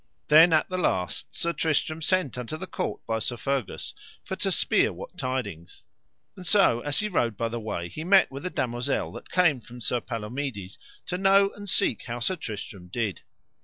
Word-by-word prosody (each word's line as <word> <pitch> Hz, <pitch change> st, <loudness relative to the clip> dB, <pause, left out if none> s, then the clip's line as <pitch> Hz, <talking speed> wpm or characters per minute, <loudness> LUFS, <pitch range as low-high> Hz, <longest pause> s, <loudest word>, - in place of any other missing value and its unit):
Then 160 Hz, +3 st, +8 dB
at 155 Hz, -1 st, +4 dB
the 185 Hz, 0 st, -3 dB
last 90 Hz, -, -1 dB
Sir 170 Hz, 0 st, 0 dB
Tristram 155 Hz, 0 st, 0 dB
sent 185 Hz, -3 st, +1 dB
unto 125 Hz, +5 st, -5 dB
the 190 Hz, -, -5 dB
court -, -, -4 dB
by 110 Hz, -1 st, -1 dB
Sir 120 Hz, +2 st, -2 dB
Fergus, 135 Hz, -2 st, -2 dB, 0.3 s
for -, -, -3 dB
to -, -, +1 dB
spere -, -, +3 dB
what -, -, -9 dB
tidings. 105 Hz, -10 st, -4 dB, 0.5 s
And 185 Hz, -, -10 dB
so 195 Hz, -, +5 dB
as 145 Hz, +3 st, 0 dB
he 215 Hz, -, 0 dB
rode 120 Hz, -, 0 dB
by 115 Hz, +2 st, -1 dB
the 120 Hz, +1 st, -4 dB
way 95 Hz, -6 st, -4 dB
he 155 Hz, -, -7 dB
met 190 Hz, -1 st, +5 dB
with 135 Hz, +3 st, -7 dB
a -, -, -2 dB
damosel 125 Hz, -2 st, -1 dB
that -, -, -10 dB
came 165 Hz, -8 st, +3 dB
from 120 Hz, +2 st, -12 dB
Sir 120 Hz, 0 st, -1 dB
Palomides, 110 Hz, -3 st, -5 dB, 0.3 s
to 180 Hz, -, -3 dB
know 195 Hz, +1 st, +5 dB
and 205 Hz, -1 st, -7 dB
seek 115 Hz, -, +2 dB
how 120 Hz, 0 st, -4 dB
Sir 185 Hz, +10 st, 0 dB
Tristram 105 Hz, -, -7 dB
did. 105 Hz, +1 st, -2 dB
130 Hz, 195 wpm, -27 LUFS, 115-170 Hz, 0.5 s, Then